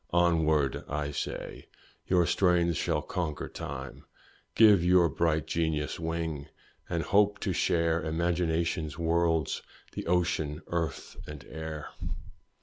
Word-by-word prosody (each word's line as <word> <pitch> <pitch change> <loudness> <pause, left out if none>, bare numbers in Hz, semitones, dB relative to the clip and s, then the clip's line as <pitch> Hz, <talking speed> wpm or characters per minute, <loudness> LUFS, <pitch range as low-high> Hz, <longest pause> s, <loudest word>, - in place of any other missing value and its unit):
Onward! 80 -5 +2
I 75 0 -2
say - - -5 0.4
your 90 -2 +4
strains 85 -2 +3
shall 80 -3 0
conquer 80 -3 -3
time; - - -7 0.5
Give 105 -6 +7
your 90 -1 +5
bright 80 -2 +1
genius 80 -2 -1
wing, 80 -3 -3 0.4
and 85 -2 -1
hope 105 0 +3
to - - 0
share 85 -1 +1
Imagination's 80 -1 0
worlds 85 -2 +1 0.3
the - - -6
ocean, 85 -3 0
earth, 85 -2 -3
and 75 -2 -9
air. 80 0 -6
80 Hz, 115 wpm, -29 LUFS, 80-85 Hz, 0.5 s, Give